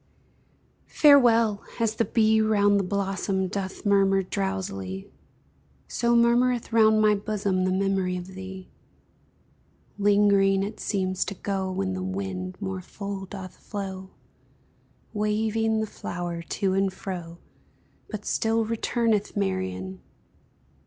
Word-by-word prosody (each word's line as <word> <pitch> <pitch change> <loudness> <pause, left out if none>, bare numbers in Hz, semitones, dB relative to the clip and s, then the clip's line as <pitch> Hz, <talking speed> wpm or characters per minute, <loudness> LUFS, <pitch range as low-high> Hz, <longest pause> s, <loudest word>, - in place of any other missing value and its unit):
Farewell! 230 -8 +5 0.2
as 225 -2 +1
the 225 +1 0
bee 220 -1 +3
round 205 -2 +3
the - - 0
blossom 195 0 -1
Doth 190 +2 -5
murmur 195 -1 +3
drowsily, 180 - -4 0.8
So 235 0 +1
murmureth 240 +1 +3
round 220 -1 +5
my 210 0 +5
bosom 200 -2 -1
The 185 - +1
memory 190 -1 0
of 180 +1 -7
thee; 190 0 -9 1.3
Lingering, 200 -1 +4
it 210 +2 -5
seems 185 -2 -1
to 200 - -5
go, 190 0 -2
When 190 0 -2
the 185 - -4
wind 185 -1 -4
more 190 -2 -4
full 195 +1 -6
doth 185 -2 -9
flow, 190 -2 -6 1.0
Waving 220 +1 0
the - - 0
flower 175 -4 -5
to 190 +3 -1
and 195 0 +1
fro, 175 -3 -7 0.7
But 210 -2 -6
still 225 0 +1
returneth, 225 -1 0
Marian! 95 -1 -2
195 Hz, 120 wpm, -26 LUFS, 185-215 Hz, 1.3 s, Farewell